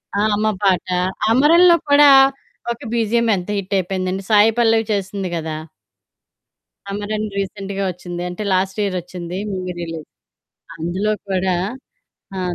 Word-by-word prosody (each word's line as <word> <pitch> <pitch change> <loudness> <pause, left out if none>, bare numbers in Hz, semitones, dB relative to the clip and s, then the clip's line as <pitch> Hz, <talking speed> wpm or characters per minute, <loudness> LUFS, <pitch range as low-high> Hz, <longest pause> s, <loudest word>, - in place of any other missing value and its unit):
ఆ! 200 - +1
అమ్మ 215 +1 0 0.2
పాట. 190 -3 +2 0.4
'అమరన్‌లో' 335 +8 +6
కూడా 285 0 +7 0.6
ఒక 235 - -5
బీజీఎం 235 0 +1
ఎంత 180 +2 -7
హిటయిపోయిందండి 190 0 -2
సాయి 210 +1 +6
పల్లవి 225 -1 +3
చేసింది 195 -1 -3
గదా! 160 -1 -4 1.3
'అమరన్' 210 +2 -3
రీసెంట్‌గా 195 0 -3
వచ్చింది. 175 0 -7
అంటే 180 +4 -5
లాస్ట్ 190 +2 0
ఇయరొచ్చింది. 180 -2 -4
Movie 185 -1 -4
release. 165 -2 -6 0.7
అందులో 185 +6 -1 0.2
కూడా 185 -1 0 0.8
ఆ! - - -2
195 Hz, 115 wpm, -19 LUFS, 185-215 Hz, 1.3 s, కూడా